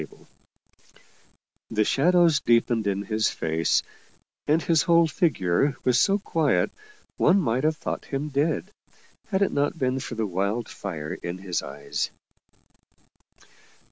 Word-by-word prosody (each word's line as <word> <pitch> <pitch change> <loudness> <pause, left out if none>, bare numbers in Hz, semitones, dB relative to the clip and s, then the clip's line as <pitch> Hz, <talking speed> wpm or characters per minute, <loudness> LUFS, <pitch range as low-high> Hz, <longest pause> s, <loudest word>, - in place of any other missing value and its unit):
The 110 -1 +1
shadows 170 - +3
deepened 115 -3 +2
in 100 0 -1
his 110 +2 0
face, 80 -1 0 0.6
and 155 +2 +3
his 165 -2 +2
whole 170 0 +4
figure 140 - +1
was 125 -1 +3
so 195 +7 +3
quiet 165 -8 +1 0.5
one 200 - +4
might 130 -6 0
have 155 0 +1
thought - - -5
him 140 +2 -3
dead, 150 +7 -1 0.6
had 195 -2 +1
it - - 0
not 145 +3 0
been 130 -2 0
for 125 - -6
the 110 -1 -1
wild 100 +4 -2
fire 80 -6 -6
in 85 +1 -6
his 95 -2 -3
eyes. 70 +1 -4
130 Hz, 130 wpm, -25 LUFS, 100-160 Hz, 0.6 s, whole